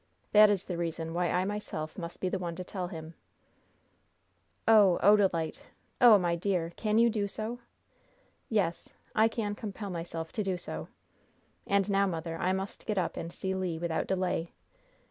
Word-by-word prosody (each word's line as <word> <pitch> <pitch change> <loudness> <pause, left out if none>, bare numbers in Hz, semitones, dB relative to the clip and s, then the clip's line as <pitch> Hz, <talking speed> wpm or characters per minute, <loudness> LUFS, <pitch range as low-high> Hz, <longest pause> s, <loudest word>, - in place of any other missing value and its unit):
That 210 0 +8
is 200 -2 0
the 175 -2 -4
reason 165 -1 -3
why 175 0 0
I 180 +1 +1
myself 195 -6 -4
must 170 -2 -7
be 185 - 0
the 190 +1 -1
one 170 -2 -4
to 185 - -5
tell 180 -1 -4
him." 160 -1 -8 1.5
"Oh, 205 -5 +6
Odalite! 190 -6 +3 0.4
Oh, 235 -4 +9
my 175 -3 +1
dear! 170 -2 -1
Can 215 -1 0
you 235 +1 +6
do 215 -3 0
so?" 220 +4 -4 0.9
"Yes, 195 -6 0 0.2
I 220 +1 +5
can 220 -2 -2
compel 205 -1 -6
myself 165 -1 -5
to 215 - -2
do 190 -2 -1
so. - - -6 0.8
And 200 -1 +2
now, 200 -1 +3
mother, 165 -2 -3
I 185 - +1
must 190 +1 -4
get 210 -2 -1
up 180 -3 0
and 165 - -5
see 190 +2 -3
Le, 185 -3 -2
without 170 -1 -1
delay. 180 -3 -1
185 Hz, 170 wpm, -30 LUFS, 170-205 Hz, 1.5 s, Oh